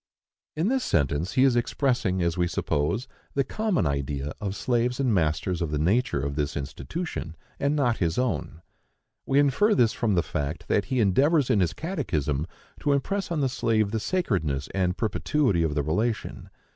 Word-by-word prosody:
In 160 +5 0
this 265 0 +1
sentence 75 +3 0
he 130 - +4
is 135 -3 +4
expressing, 120 -7 +1
as 85 -1 0
we 90 -1 +1
suppose, 85 - -1 0.3
the 140 - +3
common 215 - 0
idea 70 0 -2
of 100 -1 -3
slaves 120 +1 0
and 130 -4 +2
masters 85 0 0
of 85 - -1
the 75 - -1
nature 90 - +1
of 70 +1 -2
this 75 -1 -2
institution, 80 - -5 0.2
and 140 +1 +1
not 125 -6 +2
his 85 -2 0
own. 85 - -2 0.6
We 135 - +2
infer 145 - +4
this 115 -2 +3
from 110 -4 0
the 85 - +2
fact 80 +3 -4
that 100 - +2
he 130 -1 -1
endeavors 135 - +3
in 105 - +3
his 90 -4 +1
catechism 80 - -2 0.3
to 145 - +1
impress 195 +8 -1
on 165 -3 -1
the 135 - +2
slave 110 -4 +1
the 110 - -1
sacredness 90 - -1
and 90 -1 0
perpetuity 115 - +1
of 80 -3 0
the 75 - +1
relation. 105 +10 -2
105 Hz, 180 wpm, -26 LUFS, -, 0.6 s, he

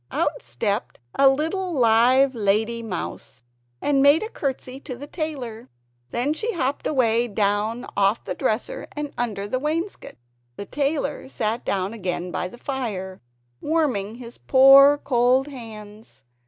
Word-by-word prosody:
Out - - -1
stepped 200 - -3 0.2
a 275 -1 +6
little 330 +7 -1
live 255 +2 +4
lady 220 +1 +1
mouse, 180 - -6 0.4
and 280 -2 +2
made 285 +7 +5
a 440 - -5
courtesy 265 -1 -4
to 270 -2 -7
the 275 +4 -8
tailor! 275 -8 -5 0.4
Then 255 +5 0
she 450 +8 -3
hopped 280 -5 -2
away 240 -4 +2
down 210 +2 0
off 200 +2 +2
the - - -4
dresser, 260 - -2
and 295 -1 -4
under 210 -4 -3
the 255 +5 -1
wainscot. 325 +7 -3 0.4
The 200 - -7
tailor 285 +1 -2
sat 225 -2 -2
down 195 +1 -1
again 180 -4 -3
by 180 - -2
the 215 - -12
fire, 210 -9 -4 0.4
warming 260 -10 0
his 240 -1 -11
poor 275 +2 +7
cold 255 -1 +2
hands. 220 - -11
245 Hz, 140 wpm, -23 LUFS, 215-280 Hz, 0.4 s, poor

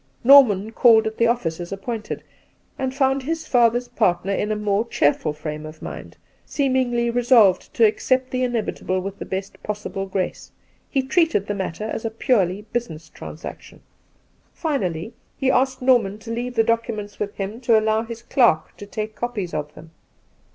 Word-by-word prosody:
Norman 230 -6 +6
called 225 -1 +5
at 220 0 -3
the 230 - +4
office 185 -9 -1
as 175 +1 -7
appointed, 210 +3 -5 0.6
and 265 -1 -1
found 270 0 +2
his 320 +4 -3
father's 240 -1 +3
partner 185 -2 0
in 210 +2 -1
a - - +1
more 210 0 0
cheerful 150 -4 +1
fi 150 +1 -5
ame 150 0 -7
of 155 0 -10
mind, - - -8 0.3
seemingly 255 -4 0
resolved 235 -6 +4
to 230 - +5
accept 255 +4 +1
the 255 - -1
inevitable 225 -6 -1
with 195 +2 -6
the - - -6
best 190 +1 -5
possible 205 -2 -4
grace; 190 -1 -3 0.4
he 270 - 0
treated 315 - +2
the 205 - -2
matter 190 -1 -4
as 220 0 -4
a 225 - -1
purely 210 -4 +1
business 165 -10 -4
trans 155 - -10
action. - - -10 0.7
Finally, 225 - -2 0.2
he 265 -1 +2
asked 260 0 +1
Norman 230 -6 +3
to 225 +2 -9
leave 245 +2 -3
the 225 - +4
documents 225 -2 -2
with 205 0 -3
him 205 +4 -5
to 235 -2 +4
allow 220 0 +1
his 230 0 -8
clerk 235 - +2
to 205 - -9
take 215 +2 -5
copies 215 -8 -4
of 150 -1 -3
them. 160 0 -13
220 Hz, 175 wpm, -22 LUFS, 195-245 Hz, 0.7 s, Norman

